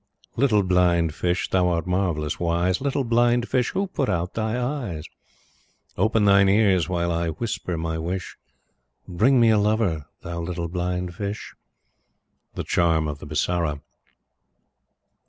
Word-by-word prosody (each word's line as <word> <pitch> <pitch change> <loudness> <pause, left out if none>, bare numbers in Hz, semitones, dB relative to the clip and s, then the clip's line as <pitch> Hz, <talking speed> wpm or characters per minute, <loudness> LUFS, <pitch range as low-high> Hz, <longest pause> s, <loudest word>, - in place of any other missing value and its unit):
Little 115 -6 +3
Blind 90 -3 +2
Fish, 90 +2 -1
thou 90 -1 +3
art 85 -2 0
marvellous 90 -5 -1
wise, 85 +3 0
Little 140 0 0
Blind 120 0 +2
Fish, 125 -2 +1
who 195 - -1
put 140 -8 -2
out 90 0 -1
thy 110 +2 -1
eyes? 120 - -3 0.9
Open 105 +2 +2
thine 100 -1 +5
ears 95 -4 +3
while 85 -1 0
I 85 0 -1
whisper 90 0 -3
my 80 0 -3
wish 90 +3 -4 0.7
Bring 120 +9 +3
me 115 -1 +5
a 110 - +4
lover, 105 -8 0
thou 85 0 -5
little 85 0 -4
Blind 90 0 -3
Fish. 100 +3 -5 1.0
The - - -3
Charm 80 -2 +1
of 75 -1 -5
the - - -10
Bisara. 75 0 -1
90 Hz, 140 wpm, -24 LUFS, 85-110 Hz, 1.0 s, thine